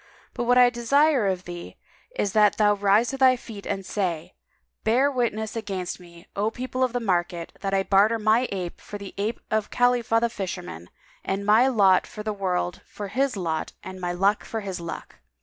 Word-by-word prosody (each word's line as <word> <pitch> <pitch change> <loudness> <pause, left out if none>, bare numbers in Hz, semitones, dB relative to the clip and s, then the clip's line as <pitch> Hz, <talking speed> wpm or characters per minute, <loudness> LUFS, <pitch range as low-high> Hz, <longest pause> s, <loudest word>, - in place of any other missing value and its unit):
But 240 - -3
what 245 +1 +4
I 245 -1 +7
desire 265 +1 +3
of 185 -1 -1
thee 175 -1 -9 0.4
is 200 - -1
that 210 -1 +4
thou 210 -1 +4
rise 205 +3 +3
to 270 - -5
thy 260 -1 +6
feet 220 -4 -10
and 195 -1 -3
say, 180 -4 -3 0.5
'Bear 255 +6 +3
witness 220 -4 -2
against 195 -6 -4
me, 170 -1 -15
O 205 +2 +1
people 255 +2 -3
of 255 - +1
the 245 - -1
market, 175 -5 -2
that 195 0 -1
I 195 - +2
barter 205 +4 +4
my 220 +3 +2
ape 180 -3 -5
for 205 - -8
the 200 -1 -9
ape 215 +3 -1
of 215 -1 0
Khalifah 245 -2 +2
the 235 - +2
Fisherman 175 - -6 0.3
and 195 +1 -2
my 220 +5 +5
lot 200 -7 +4
in 210 - -4
the 215 0 -2
world 180 -3 -2
for 205 -1 -7
his 260 +1 0
lot 160 -4 -3
and 185 0 -8
my 175 0 -1
luck 195 +4 +1
for 225 - -4
his 190 -3 -5
luck.'" 170 -1 -8
205 Hz, 200 wpm, -25 LUFS, 185-235 Hz, 0.5 s, I